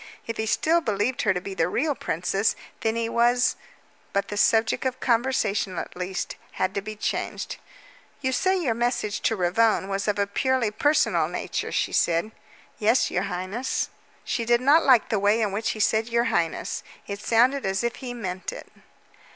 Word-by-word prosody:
If 230 - -4
he 220 - -2
still 330 +9 +2
believed 220 0 0
her 210 - +3
to - - 0
be 195 +2 -7
the 165 -4 +1
real 290 - 0
princess, 195 - 0 0.2
then 220 0 0
he 230 0 -1
was 240 +2 +3 0.6
but 200 0 0
the 205 - -4
subject 220 +2 +3
of 260 -1 -2
conversation, 225 -6 +1
at - - -5
least, 180 +1 -4 0.2
had 185 - -1
to 200 - -2
be 215 +2 -7
changed. 210 - -3 0.6
"You 260 -2 -1
say 375 +8 +2
your 270 -10 +1
message 235 -3 -1
to 225 - +1
Ravone 195 +2 +2
was 195 +1 -2
of 210 - +1
a 200 - +2
purely 250 +2 0
personal 295 +8 +2
nature," - - -3
she - - 0
said. 170 +5 +2 0.5
"Yes, 225 +4 +3
your 180 +2 0
highness." 185 +8 -2 0.3
She 235 - -2
did 240 +1 +3
not 285 +6 +5
like 255 -4 +5
the 215 - +1
way 205 +3 +3
in 215 -3 +1
which 210 +3 -1
he - - -8
said 220 +2 +2
"your 235 0 +2
highness." 165 -2 -1 0.2
It 200 0 -5
sounded 250 +6 +3
as 195 +1 -1
if 235 0 -1
he 245 -2 -6
meant 185 -5 -4
it. - - -10
220 Hz, 185 wpm, -25 LUFS, 200-245 Hz, 0.6 s, not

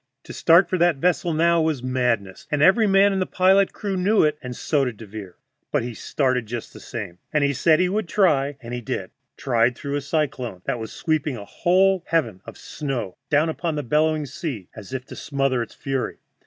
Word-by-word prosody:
To - - -10
start 170 +4 +5
for 185 - -1
that 175 -1 +4
vessel 175 +3 +1
now 170 +1 +3
was 155 -5 -1
madness, 120 -7 -1
and 150 -1 +1
every 205 +5 +5
man 195 +1 +5
in 190 - 0
the 185 - 0
pilot 190 +1 +3
crew 200 -3 -4
knew 200 +4 +3
it, 150 -1 +2
and 125 -1 -6
so 145 +2 0
did 125 -5 -3
Devere. 105 -4 -9 0.4
But - - +1
he 120 0 -5
started 130 -1 -1
just 120 0 -6
the - - -11
same. 100 -7 -7
He 145 -2 +2
said 155 +4 +3
he 180 - +3
would 205 +1 -1
try, 145 -8 +2
and 120 -1 -8
he 125 - -3
did 110 - -4 0.3
tried 120 -1 +2
through 140 +2 -4
a - - -3
cyclone 135 - -2
that 130 -3 -2
was 110 - -6
sweeping 155 -5 -1
a 100 - -8
whole 185 - +2
heaven 120 - 0
of - - -9
snow 135 -10 -4
down 150 +1 +3
upon 160 0 -2
the 150 - -2
bellowing 150 +3 +1
sea 130 - -6
as 105 0 -10
if 130 -1 -4
to - - -10
smother 135 -3 -1
its 115 - -7
fury. 135 -2 -3
140 Hz, 210 wpm, -23 LUFS, 120-170 Hz, 0.4 s, start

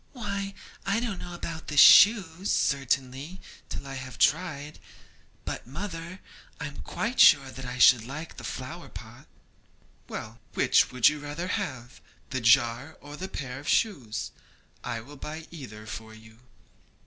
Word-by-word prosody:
'Why, 200 -5 -4 0.3
I 200 +3 +1
don't 230 -6 -3
know 175 -1 -7
about 165 -2 -6
the 150 - -5
shoes, 185 +1 +7
certainly, 135 +4 0 0.3
till - - -6
I 135 - -7
have 130 -2 -7
tried; 155 -3 0 0.7
but, - - -5
mother, 170 +3 -7 0.4
I - - -4
am 145 -1 -8
quite 235 +3 -4
sure 135 -1 +7
that 130 +2 -8
I 125 0 -5
should 125 -2 +7
like 145 +7 -8
the - - -9
flower - - -7
pot.' - - -12 0.8
'Well, 110 +2 -7 0.2
which - - +4
would 125 -2 +4
you 150 0 +2
rather 150 +5 -5
have 125 -7 -4 0.3
that 130 -2 -2
jar 120 +4 +3
or 145 0 -11
a 190 - -3
pair 135 -8 -6
of 145 - -11
shoes? 135 - 0 0.5
I 115 - -4
will 145 +6 -13
buy 155 +3 -7
either 110 -10 -9
for 110 -1 -8
you.' 110 0 -17
145 Hz, 155 wpm, -27 LUFS, 125-175 Hz, 0.8 s, shoes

